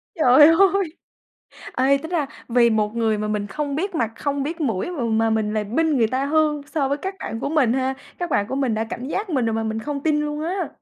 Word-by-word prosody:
Trời 295 -1 +7
ơi! 380 0 +3 0.8
Ê, 270 +2 +3
tính 320 +4 -8
ra 315 -6 0 0.2
vì 235 -1 +4
một 215 +1 0
người 220 -2 +1
mà 210 0 -2
mình 210 -1 -2
không 285 +7 -3
biết 380 +3 -2
mặt, 230 -6 -1
không 285 -1 -2
biết 325 +4 -4
mũi 230 - -1
mà 285 -9 -3
mà 225 0 +1
mình 215 -1 0
là 215 -1 0
binh 305 +7 +1
người 225 - +4
ta 260 +4 -1
hơn 300 -1 +1
so 285 -4 -1
với 285 +1 -1
các 380 +5 -4
bạn 225 - -5
của - - -2
mình 270 -7 +3
ha, 265 0 0 0.2
các 350 -2 -3
bạn 205 -5 +1
của - - -3
mình 260 -5 0
đã 220 +1 -1
cảnh 245 +4 -6
giác 390 +3 -3
mình 260 -6 +1
rồi 225 - 0
mà 225 - -1
mình 220 0 -2
không 285 +2 -4
tin 300 -2 +2
luôn 300 0 -3
á. 365 +3 -2
275 Hz, 255 wpm, -22 LUFS, 225-310 Hz, 0.8 s, Trời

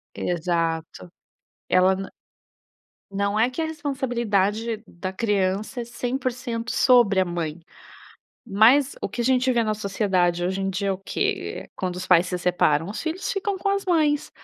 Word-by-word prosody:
Exato. 170 -1 -2 0.6
Ela 185 +1 +4
n 195 0 -5 1.0
não 200 +1 -1
é 235 +3 +3
que 255 - -5
a - - +1
responsabilidade 235 -7 -1
da 185 +2 -6
criança 205 +3 -1
é - - -4
100% 245 -1 -3
sobre 240 -7 +4
a - - +3
mãe. 170 -2 -4 0.9
Mas 240 +7 +4
o - - -2
que 210 +4 -5
a - - -3
gente 255 0 +3
vê 235 -1 +2
na 215 -1 0
sociedade, 190 -4 0
hoje 190 +2 -1
em 195 - -1
dia, 195 +1 -2
é 195 - +2
o 185 - -5
quê? 395 - -3
Quando 185 -1 -3
os 185 - -5
pais 180 -1 +5
se 180 - -2
separam, 175 -3 +1
os 215 - -5
filhos 335 +4 -3
ficam 395 0 -2
com 395 +2 -2
as 395 0 -1
mães. 305 -4 +2
210 Hz, 165 wpm, -24 LUFS, 185-255 Hz, 1.0 s, pais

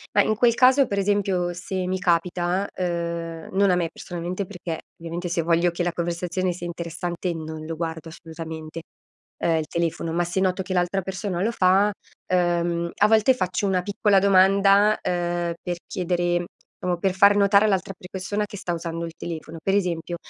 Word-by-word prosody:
Mah, - - +7
in 215 - +1
quel 235 +2 +4
caso 260 +3 +5
per 200 -4 -2
esempio 195 -3 +1
se 185 +1 -4
mi 185 +1 0
capita, 180 +2 0
uhm, 170 -2 -3
non 195 0 +4
a - - +4
me 170 -2 0
personalmente 180 +3 -5
perché, 175 -3 -6 0.2
ovviamente, 170 +2 -5
se 170 0 0
voglio 170 +1 +2
che 170 - -4
la 175 0 +1
conversazione 175 +2 -2
sia 175 0 -6
interessante 170 +1 -4
non 160 -1 -6
lo 165 +1 -4
guardo 160 0 -5
assolutamente, 160 -1 -8 0.6
uhm, 165 -1 +3
il 155 - -3
telefono, 165 0 -2
ma 175 +1 +1
se 175 +2 -1
noto 190 0 +1
che 185 - -6
l'altra 180 +1 +1
persona 190 -1 -3
lo 220 - +1
fa, 195 0 +3 0.4
uhm, 170 -1 +1
a 205 - +5
volte 220 +4 +4
faccio 185 -2 -1
una 185 -2 +1
piccola 205 +1 +2
domanda, 195 +2 +5
uhm, 175 -1 -1
per 175 -1 -3
chiedere 175 -1 -1 0.4
diciamo 180 -1 0
per 190 +2 +1
far 200 +2 +5
notare 200 +1 +5
all'altra 195 -2 0
pre 180 -1 -13
persona 205 +2 -2
che 205 - -9
sta 180 -2 -3
usando 165 0 -4
il 165 - -6
telefono, 165 -1 -6
per 195 - +1
esempio: 175 -3 -1
180 Hz, 185 wpm, -24 LUFS, 170-195 Hz, 0.6 s, Mah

